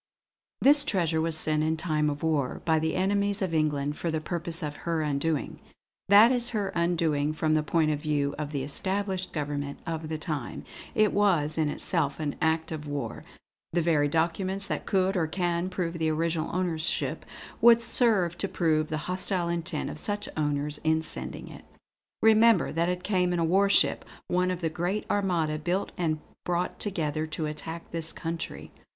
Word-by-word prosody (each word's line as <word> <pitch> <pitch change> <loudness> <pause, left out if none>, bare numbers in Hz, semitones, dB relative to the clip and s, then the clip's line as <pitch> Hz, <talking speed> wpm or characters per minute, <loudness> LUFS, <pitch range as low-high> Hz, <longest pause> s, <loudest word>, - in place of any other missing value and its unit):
"This 290 +2 +6
treasure 170 - +1
was 165 -1 +2
sent, 155 -1 +2
in 160 +1 0
time 155 -2 0
of 145 +1 -5
war, 150 -5 0
by 160 -1 +3
the 160 0 -1
enemies 200 +2 +1
of 180 -3 -2
England, 150 -2 0
for 170 - -2
the 160 -1 -1
purpose 170 +1 -1
of 150 -1 -4
her 165 -2 -1
undoing 150 +1 -1 0.5
that 210 +4 +8
is 245 -1 +1
her 205 -4 -1
undoing 165 -4 0
from 155 0 0
the 155 - +3
point 155 +1 +1
of 150 - -1
view 145 -2 0
of 150 -1 -4
the 140 -3 -2
established 190 +5 -1
government 145 -2 -3
of 160 -2 -4
the 160 - -2
time. 155 -6 -5 0.3
It 215 -1 +3
was 170 -7 +2
in 155 -2 +1
itself 140 0 +1
an 150 -2 -2
act 160 0 +1
of 150 -2 -5
war. 145 -1 -4 0.5
The 170 -1 +2
very 155 -3 +3
documents 185 +5 0
that - - -4
could, 190 0 +2
or 165 -4 +1
can, 175 +1 -1
prove 170 -2 -3
the 160 -1 +1
original 160 0 -1
ownership, 170 -3 -1 0.4
would 235 0 +8
serve 210 -8 +2
to 195 - -1
prove 155 -4 +1
the 155 -1 -3
hostile 185 -1 -1
intent 170 -2 -2
of 150 - -9
such 205 +3 -2
owners 150 -1 -1
in 160 0 +1
sending - - -7
it. - - -11 0.6
Remember, 225 -2 +5
that 170 +2 0
it 180 0 -3
came 180 -3 +1
in - - 0
a 165 - +1
warship, 195 +4 +4 0.2
one 180 +1 +1
of 180 -1 -3
the 165 - 0
great 175 +6 -2
Armada 170 -6 0
built 180 +5 -1
and 155 -3 -1 0.2
brought 175 0 -2
together 155 -6 -2
to 155 0 -3
attack 160 +2 -6
this 165 -1 -3
country. 165 0 -5
165 Hz, 180 wpm, -27 LUFS, 155-185 Hz, 0.6 s, that